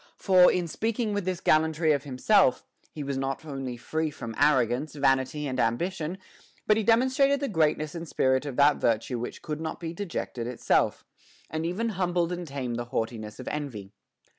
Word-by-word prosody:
For, 185 -2 +6
in 180 -2 -1
speaking 220 +4 -1
with 205 -3 -2
this 185 -1 -2
gallantry 160 0 +3
of 145 -1 0
himself, 130 +2 +3 0.3
he 150 - -6
was 140 -1 -3
not 135 +3 -3
only 135 -4 -5
free 160 +6 -2
from 115 -6 -7
arrogance, 135 +1 +2
vanity, 135 +1 +1
and 130 -2 -3
ambition, 160 +9 -1 0.5
but 215 - +4
he 220 - +1
demonstrated 260 +5 +3
the 280 - -1
greatness 155 - +1
and 170 -1 -6
spirit 130 0 +1
of 135 - -5
that 145 +2 +5
virtue 115 +2 0
which 120 - -6
could 155 0 -4
not 160 - -4
be 165 -1 -5
dejected 165 - -4
itself, 125 -1 0 0.5
and 160 +1 -2
even 220 +7 -1
humbled 180 -3 0
and 175 -1 -4
tamed 130 -4 -4
the 120 - -3
haughtiness 110 -2 -4
of - - -8
envy. 120 -10 -5
150 Hz, 180 wpm, -27 LUFS, 130-180 Hz, 0.5 s, For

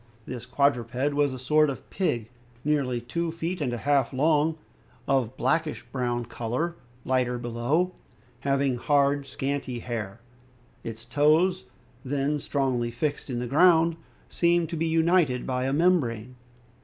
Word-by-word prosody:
This 125 -2 -7
quadruped 130 0 +1
was 145 -1 +2
a 130 - -5
sort 150 +4 +3
of 135 - -6
pig 120 - -1 0.3
nearly 140 -5 +1
two 165 +8 -2
feet 165 +1 -4
and 130 -4 0
a 120 - -2
half 140 +2 +1
long, 155 +3 +2 0.5
of 135 -2 +3
a 115 +4 -15
blackish 155 -8 0
brown 120 -2 -1
color, 120 +9 -3 0.3
lighter 125 -1 +1
below, 120 +9 0 0.5
having 135 -1 +1
hard 140 +1 +2
scanty 135 -1 -3
hair; 115 -3 -5 0.6
its 115 0 -7
toes, 155 +8 +3 0.4
then 145 +2 -1
strongly 130 -4 -1
fixed 145 +5 -3
in 125 - -2
the 120 - -2
ground, 165 +4 +4 0.3
seemed 170 -1 +2
to - - -3
be 165 +1 0
united 160 -5 +2
by 130 -1 -1
a 135 - 0
membrane. 135 -8 +1
140 Hz, 145 wpm, -26 LUFS, 120-155 Hz, 0.6 s, ground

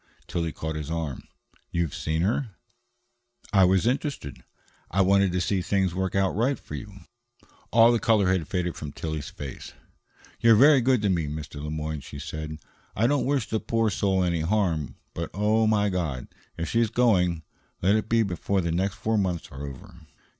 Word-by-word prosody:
Tillie 85 -2 -2
caught 80 0 -5
his 75 -1 -5
arm. 80 -5 -4 0.4
"You've 85 -4 -1
seen 80 +1 -1
her?" 110 +1 -1 1.0
"I 95 -2 +6
was 95 +2 +3
interested. 125 - -2 0.5
I 95 - +2
wanted 100 0 +4
to 90 - 0
see 90 +2 0
things 95 -1 0
work 95 +1 -2
out 95 -1 +2
right 125 +6 +1
for - - -12
you." 100 -2 -8 0.7
All 115 +1 +6
the 120 - +2
color 110 -5 +3
had 90 -4 +1
faded 90 0 -2
from 75 -2 -7
Tillie's 80 -3 -4
face. 70 -3 -8 0.7
"You're 115 -1 +6
very 140 +4 +7
good 125 -2 +2
to 100 - +2
me, 85 -5 0
Mr. 75 -1 -6
Le 75 - -4
Moyne," 75 0 -3
she 70 +1 -10
said. 75 +1 -6 0.4
"I 110 - +2
don't 140 +2 +2
wish 140 -4 +1
the 110 - -1
poor 115 -1 0
soul 95 -1 +1
any 85 -2 0
harm, 85 -4 0 0.2
but 85 -1 -4
oh, 110 +2 +2
my 105 -1 +3
God! 80 -9 -2 0.3
if 85 0 -3
she's 115 +4 +2
going, 90 -9 +2 0.4
let 95 +3 +4
it 110 0 0
be 115 0 +4
before 95 0 -1
the 85 -1 -1
next 95 +4 0
four 110 0 0
months 90 -5 -2
are 70 +1 -6
over." 75 +4 -12
95 Hz, 185 wpm, -26 LUFS, 80-110 Hz, 1.0 s, very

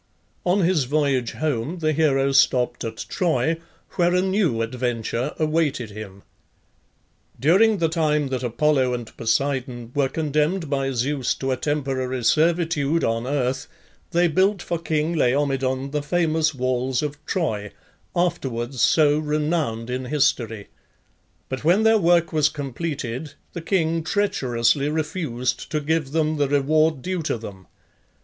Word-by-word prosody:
On 190 +3 +3
his 170 -6 +2
voyage 135 -3 0
home 150 +1 -2
the 155 -2 0
hero 140 -3 +2
stopped 130 -3 +2
at 115 -1 -5
Troy, 165 -2 0 0.4
where 175 0 +3
a 180 - +3
new 190 - +1
adventure 120 +2 -2
awaited 155 -7 0
him. 100 -2 -9 1.2
During 200 +9 +4
the 165 -2 +2
time 150 -3 +1
that 130 -2 -2
Apollo 130 +1 +1
and 120 -2 -8
Poseidon 120 0 -1
were 140 -2 +1
condemned 155 +2 -1
by 135 -1 0
Zeus 135 +1 -1
to 135 0 -2
a - - +2
temporary 130 -3 -2
servitude 165 +1 +2
on 115 +2 0
earth, 135 0 -1 0.4
they 175 0 +3
built 190 +5 +2
for 170 - -2
king 160 0 -1
Laomedon 135 -1 0
the 150 0 -1
famous 160 -1 +1
walls 130 +1 0
of 150 0 -5
Troy, 110 - -2 0.4
afterwards 130 -8 -1
so 150 -2 +4
renowned 150 -6 -1
in 130 +1 -3
history; 120 -7 0 0.8
but 130 +2 -5
when 180 +7 +4
their 220 0 +5
work 170 -2 +3
was 155 -1 +3
completed 145 -1 -5 0.2
the 170 - -5
king 165 -2 0
treacherously 140 - +1
refused 150 -6 -2
to 155 - -1
give 155 -1 -1
them 155 0 0
the 145 -1 +2
reward 150 +1 +2
due 185 -2 -2
to 155 - -1
them. 100 -4 -10
145 Hz, 140 wpm, -23 LUFS, 130-160 Hz, 1.2 s, their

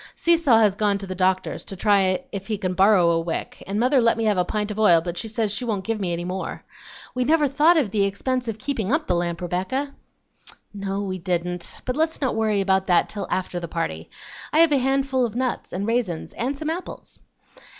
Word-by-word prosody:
Seesaw 330 -8 +4
has 215 -3 +4
gone 205 0 +1
to 195 - -5
the 185 - -5
doctor's 185 0 0
to 195 - -7
try 195 +3 +2
if 195 -1 -6
he 215 -2 -1
can 185 -2 -2
borrow 190 -2 +5
a 165 - +2
wick, 165 0 -5
and 200 +2 -2
mother 255 +2 +3
let 230 0 +3
me 225 - -1
have 210 -3 +2
a - - +3
pint 210 +3 -2
of 210 - -5
oil, 175 -6 +6
but 170 +1 -5
she 180 - -3
says 215 -1 -1
she 250 - -2
won't 210 -5 -2
give 225 0 -2
me 185 -3 -2
any 170 0 -3
more. 185 +1 -5 0.5
We 255 - 0
never 300 +2 +3
thought 305 +5 +4
of 255 -11 +1
the 205 -1 +2
expense 250 +5 -2
of 225 -2 -3
keeping 225 -4 -2
up 310 +2 +1
the - - 0
lamp, 170 0 -2
Rebecca." 190 +11 -2 0.8
"No, 200 0 -3
we 185 -2 -4
didn't, 175 0 -3
but 250 - -2
let's 320 +1 0
not 265 -3 0
worry 215 -2 +1
about 190 0 +1
that 175 - +3
till 200 -2 -5
after 180 -1 -2
the 170 - -6
party. 85 - -4 0.4
I - - +1
have 330 -2 +5
a 285 - +4
handful 270 0 +1
of 230 -2 -2
nuts 255 0 -2
and 190 +3 -3
raisins 225 -8 -2
and 265 +4 -2
some 310 +2 -2
apples." 350 +3 -7
210 Hz, 230 wpm, -23 LUFS, 185-255 Hz, 0.8 s, oil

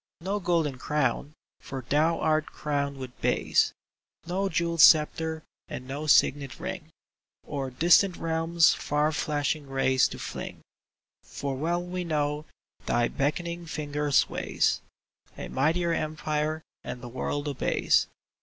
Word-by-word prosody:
No 195 +4 -1
golden 165 -7 0
crown, 145 0 -1 0.3
for 130 -3 -7
thou 160 +4 +2
art 155 -1 +1
crowned 140 -2 -2
with 130 -2 -9
bays; - - +2 0.5
No 190 +3 -1
jewelled 170 -1 +1
sceptre, 160 0 +5 0.2
and 125 - -7
no 145 +3 -4
signet 140 -1 +3
ring, 180 -2 -6 0.6
O'er 140 -3 -3
distant 175 +7 +4
realms 165 0 +3
far 150 +1 0
flashing 145 -1 -1
rays 135 -1 +2
to - - -8
fling; - - -6 0.6
For 140 -1 -5
well 170 +5 -1
we 180 0 -4
know 150 -2 -1 0.4
thy 120 0 +2
beckoning 170 +4 -2
finger 150 -1 -3
sways - - +2 0.6
A - - -6
mightier 165 +5 +1
empire, 155 0 -2 0.2
and 125 0 -7
the - - -6
world 145 +4 -3
obeys. 140 -3 +2
150 Hz, 125 wpm, -27 LUFS, 140-165 Hz, 0.6 s, sceptre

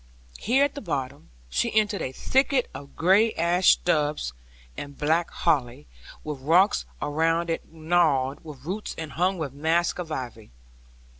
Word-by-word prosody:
Here 260 +5 +3
at 285 - -3
the 285 - -7
bottom, 135 - -4 0.2
she - - -1
entered 210 -1 -1
a 130 - -3
thicket 265 - +1
of 140 0 -10
gray 200 +6 +4
ash 175 +2 +4
stubs 150 - 0 0.4
and 140 -1 -8
black 160 +3 +1
holly, 140 -4 0 0.4
with 150 -3 -5
rocks 175 +9 +3 0.2
around 165 +3 +1
it 165 - -5
gnarled 155 -5 +1
with 145 -4 -11
roots, 200 +5 -4
and 160 -2 -6
hung 185 +4 0
with 150 -5 -4
masks 165 +5 0
of 170 -3 -5
ivy. 120 -6 -6
160 Hz, 150 wpm, -25 LUFS, 140-180 Hz, 0.4 s, gray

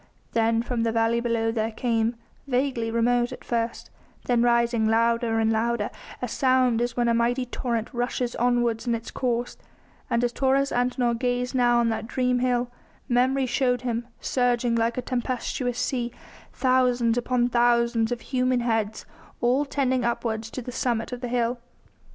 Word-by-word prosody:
Then 230 0 +2
from 240 -1 -2
the 230 0 +1
valley 230 +1 +2
below 230 -1 0
there 220 -1 -1
came, 230 0 0 0.3
vaguely 250 -3 0
remote 240 +1 +1
at - - -9
first, 230 -1 -3 0.3
then 240 -2 +2
rising 235 -2 +2
louder 230 0 +2
and 220 0 +2
louder, 225 -1 0 0.3
a - - 0
sound 255 -1 +2
as 240 0 -2
when 240 -1 +2
a 235 - +3
mighty 240 +2 +1
torrent 235 -2 -3
rushes 245 0 -2
onwards 240 -1 +1
in 235 - +2
its 230 0 -7
course; 245 -1 -2 0.5
and 235 +1 +1
as 240 0 0
Taurus 275 +1 +2
Antinor 245 -1 +1
gazed 245 +1 -1
now 240 -2 +3
on 235 -1 +3
that 220 0 -3
dream 250 0 +1
hill, 245 -1 0 0.4
memory 260 +2 +2
showed 250 0 +1
him, 235 -1 -3
surging 245 -2 +1
like 230 +1 +1
a 250 - -2
tempestuous 245 0 -2
sea, 245 -2 -1 0.4
thousands 250 -3 +2
upon 245 0 +1
thousands 235 -1 +2
of 240 -1 -2
human 255 -1 0
heads, 225 -2 -1 0.3
all 255 +4 +2
tending 260 -3 0
upwards 225 -2 -2
to 255 - -6
the 250 - -6
summit 240 -2 -1
of 250 -1 -6
the 250 - -3
hill. 240 0 0
240 Hz, 165 wpm, -25 LUFS, 230-250 Hz, 0.5 s, a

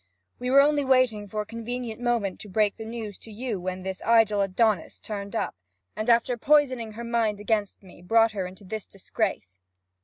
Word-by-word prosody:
We 250 - -2
were 275 +2 +7
only 290 0 +3
waiting 255 -6 +2
for 210 +2 -3
a - - -6
convenient 230 +1 -5
moment 235 -6 0
to 210 - -8
break 210 +1 +2
the 220 - -7
news 220 -3 -6
to 225 - -11
you 225 -1 -4
when 185 0 -4
this 190 0 -4
idle 225 -3 +4
Adonis 200 0 +1
turned 200 -2 -6
up, - - -1 0.4
and 215 +3 -2
after 235 +1 +3
poisoning 255 -4 +2
her 235 +2 -7
mind 230 -3 0
against 210 -1 -1
me, 180 -2 -15
brought 225 +5 +4
her 195 -4 -3
into 190 +3 -12
this 215 +2 -6
disgrace.' 95 - -3
220 Hz, 190 wpm, -26 LUFS, 200-235 Hz, 0.4 s, were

